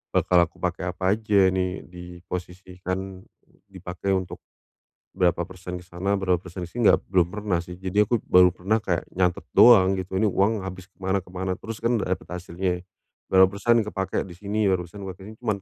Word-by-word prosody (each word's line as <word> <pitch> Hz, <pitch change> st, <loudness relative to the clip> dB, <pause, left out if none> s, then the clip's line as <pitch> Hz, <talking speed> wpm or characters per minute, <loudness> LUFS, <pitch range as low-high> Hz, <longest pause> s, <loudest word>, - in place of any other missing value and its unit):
bakal 90 Hz, -, +3 dB
aku 85 Hz, 0 st, +1 dB
pakai 90 Hz, 0 st, -2 dB
apa 95 Hz, -, -9 dB
aja, 105 Hz, -3 st, +3 dB
ini 95 Hz, 0 st, -2 dB
diposisikan, 90 Hz, +1 st, -7 dB, 0.5 s
dipakai 95 Hz, 0 st, -3 dB
untuk 95 Hz, -1 st, -4 dB, 0.8 s
berapa 90 Hz, -1 st, +2 dB
persen 90 Hz, -1 st, -7 dB
di 90 Hz, -, -15 dB
sana, 95 Hz, +3 st, -1 dB
berapa 95 Hz, -2 st, +2 dB
persen 90 Hz, 0 st, -8 dB
di -, -, -18 dB
sini, 115 Hz, +2 st, +4 dB
enggak -, -, +3 dB
belum 90 Hz, -3 st, +3 dB
pernah 100 Hz, -5 st, -2 dB
sih. 90 Hz, +1 st, -10 dB
Jadi 95 Hz, +3 st, +2 dB
aku 115 Hz, +2 st, 0 dB
baru 90 Hz, 0 st, +6 dB
pernah 105 Hz, +5 st, -1 dB
kayak 85 Hz, -5 st, -1 dB
nyatet 90 Hz, -2 st, 0 dB
doang, 95 Hz, -6 st, +7 dB
gitu, 95 Hz, 0 st, -3 dB
ini 110 Hz, -, +3 dB
uang 100 Hz, 0 st, +1 dB
habis 95 Hz, +1 st, -9 dB
ke -, -, -40 dB
mana 95 Hz, 0 st, -1 dB
ke 90 Hz, -, -17 dB
mana, 95 Hz, 0 st, -2 dB
terus 110 Hz, +1 st, -8 dB
kan 115 Hz, +1 st, +1 dB
udah 100 Hz, -4 st, -2 dB
dapat 95 Hz, -, -3 dB
hasilnya. 90 Hz, 0 st, -3 dB, 0.5 s
Berapa 95 Hz, 0 st, +7 dB
persen 110 Hz, +4 st, +1 dB
kepakai 95 Hz, -2 st, -2 dB
di 90 Hz, -, -10 dB
sini, 105 Hz, +4 st, -2 dB
berapa 95 Hz, -2 st, +2 dB
persen 95 Hz, +2 st, -9 dB
cuman 105 Hz, -5 st, -2 dB
95 Hz, 190 wpm, -25 LUFS, 90-100 Hz, 0.8 s, doang